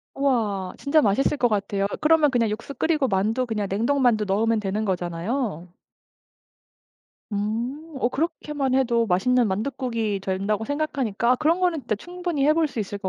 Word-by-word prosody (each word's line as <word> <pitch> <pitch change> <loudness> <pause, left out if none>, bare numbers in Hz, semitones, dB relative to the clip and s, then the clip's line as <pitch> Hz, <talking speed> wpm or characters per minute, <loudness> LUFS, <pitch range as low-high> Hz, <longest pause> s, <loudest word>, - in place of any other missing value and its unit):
우와 215 -9 0
진짜 295 +2 +3
맛있을 270 +6 +2
것 245 - +3
같아요. 200 -2 -1 0.2
그러면 310 -2 +4
그냥 230 -4 +2
육수 230 +6 -5
끓이고 300 +1 +1
만두 220 +5 0
그냥 215 -4 -2
냉동 235 +8 +1
만두 225 -4 +3
넣으면 220 +3 +1
되는 210 +1 -2
거잖아요. 180 - -2 1.7
음 220 +6 -2 0.2
어 240 - +2
그렇게만 295 -3 -2
해도 235 -3 +2
맛있는 235 +5 +2
만둣국이 225 -1 -2
된다고 195 +3 -1
생각하니까 260 -6 0
아 - - +5
그런 310 +6 +1
거는 350 -4 +1
진짜 230 -4 -2
충분히 350 - -2
해볼 310 +1 +3
수 250 - -8
있을 205 -1 -3
것 190 - -3
235 Hz, 355 characters per minute, -24 LUFS, 205-280 Hz, 1.7 s, 아